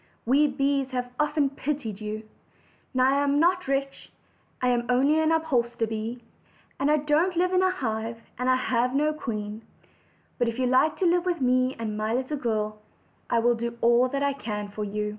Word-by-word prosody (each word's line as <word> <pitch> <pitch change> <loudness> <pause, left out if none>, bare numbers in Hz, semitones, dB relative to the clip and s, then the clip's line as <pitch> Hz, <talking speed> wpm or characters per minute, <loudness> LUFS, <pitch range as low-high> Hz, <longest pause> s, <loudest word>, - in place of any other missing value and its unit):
We 280 +5 +4
bees 275 -1 0
have 250 -1 -3
often 295 -2 +1
pitied 270 -8 -4
you. 215 +1 -4 0.7
Now 260 +1 +3
I 280 - +2
am 285 0 +2
not 360 0 +2
rich; 275 0 -2 0.5
I 250 - +1
am 240 -1 0
only 275 +5 +3
an 315 0 +2
upholsterer 240 -8 +1
bee, 225 +2 -5 0.6
and 275 - +1
I 305 - +4
don't 310 +5 +1
live 365 +1 +2
in 365 - +4
a 375 - +4
hive, 225 -6 -3 0.2
and 250 +1 0
I 255 - +5
have 250 0 0
no 300 +2 +2
queen; 215 -6 -5 0.8
but 240 - +2
if 230 0 -3
you 255 - +1
like 255 +5 +3
to - - +3
live 350 +1 +2
with 350 -2 0
me 255 0 +2
and 225 -1 -3
be - - -5
my 215 +2 -1
little 265 +4 -2
girl, 215 -4 -2 0.5
I 235 - +2
will 240 +1 +3
do 235 0 -4
all 240 +2 +4
I 280 0 0
can 210 -6 -5
for 210 +1 -5
you." 210 +1 -2
255 Hz, 200 wpm, -26 LUFS, 230-290 Hz, 0.8 s, I